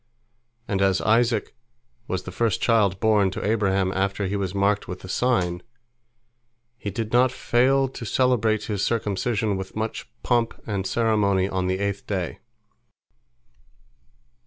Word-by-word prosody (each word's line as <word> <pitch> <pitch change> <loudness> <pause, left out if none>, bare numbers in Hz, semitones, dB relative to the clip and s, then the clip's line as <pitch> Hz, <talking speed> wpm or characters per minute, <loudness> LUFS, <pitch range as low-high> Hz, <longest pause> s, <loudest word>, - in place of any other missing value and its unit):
And 100 -2 -1
as 95 -1 +3
Isaac 115 0 +2 0.5
was 95 - -2
the 90 - -7
first 110 +2 0
child 105 -5 +2
born 105 -3 +3
to 95 - -5
Abraham 100 -3 +1
after 95 +1 -1
he 95 +2 -2
was 95 -1 -2
marked 100 +1 +1
with 90 0 -7
the - - -9
sign, 90 -5 0 1.1
he 105 - -5
did 110 +3 -4
not 125 +1 +4
fail 135 +2 +2
to 125 - -9
celebrate 115 -3 +1
his 100 -3 -2
circumcision 105 -1 0
with 95 0 -7
much 110 +1 -4
pomp 120 -2 0
and 100 -3 -2
ceremony 105 -5 +2
on 95 -1 -2
the 95 0 0
eighth 100 0 -3
day. 95 -5 -3
105 Hz, 140 wpm, -24 LUFS, 95-115 Hz, 1.1 s, not